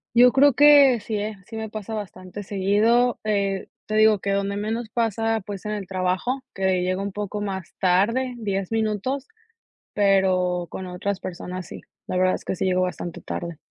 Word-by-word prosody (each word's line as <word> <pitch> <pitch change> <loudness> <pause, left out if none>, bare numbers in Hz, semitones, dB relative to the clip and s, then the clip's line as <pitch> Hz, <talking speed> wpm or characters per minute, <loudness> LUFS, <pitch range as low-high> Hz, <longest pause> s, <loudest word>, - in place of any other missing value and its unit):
Yo 245 +1 +7
creo 280 0 +5
que 285 -3 +7
sí, 215 +1 -4
¿eh? 210 -1 -4
Sí, 225 -1 -7
me 220 -1 -4
pasa 215 +1 -5
bastante 195 -1 -7
seguido, 210 +6 +2
eh, 200 -2 -1 0.2
te 215 - -2
digo 215 -2 +5
que 200 - -4
donde 200 0 -1
menos 220 +2 -3
pasa, 225 -1 0
pues 200 -2 -6
es - - -22
en 210 - -2
el 205 -3 -4
trabajo, 190 +8 -1
que 190 -2 +1
llego 185 +1 -1
un 200 0 -3
poco 205 +1 -4
más 190 -3 -5
tarde, 230 +8 +2
10 195 -3 -3
minutos, 225 +5 -1 0.7
pero 185 -3 +2
con 190 - -6
otras 185 +2 -3
personas 180 0 -6
sí, - - -9 0.3
la 180 - -2
verdad 185 0 +3
es - - -6
que - - -2
sí 190 - -2
llego 185 0 +2
bastante 175 -2 -4
tarde. 170 -2 -5
200 Hz, 190 wpm, -24 LUFS, 185-225 Hz, 0.7 s, Yo